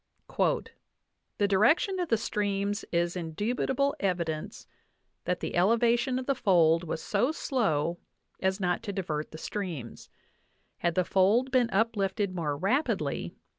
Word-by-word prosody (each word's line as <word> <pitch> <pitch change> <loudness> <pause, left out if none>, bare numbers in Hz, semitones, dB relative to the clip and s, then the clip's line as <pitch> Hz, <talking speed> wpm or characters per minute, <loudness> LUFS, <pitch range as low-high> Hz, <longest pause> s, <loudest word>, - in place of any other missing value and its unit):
"The 205 - -3
direction 265 - +3
of 355 - -2
the 230 - +3
streams 205 -1 -1
is 170 0 0
indubitable 235 - -1
evidence 170 -5 -2 0.6
that 180 0 -1
the - - -3
elevation 235 +7 +3
of 260 - -3
the 275 - +2
fold 175 -9 +3
was 160 -1 -4
so 230 +8 +1
slow 175 - 0 0.4
as 190 +1 0
not 180 -2 0
to 200 - -5
divert 155 -6 -3
the 155 - -10
streams.... 165 - -6 0.7
Had 170 -1 0
the 185 - +2
fold 210 +9 +3
been 250 -3 +3
uplifted 200 -3 0
more 155 -5 -2
rapidly 235 - -1
195 Hz, 135 wpm, -29 LUFS, 175-235 Hz, 0.7 s, direction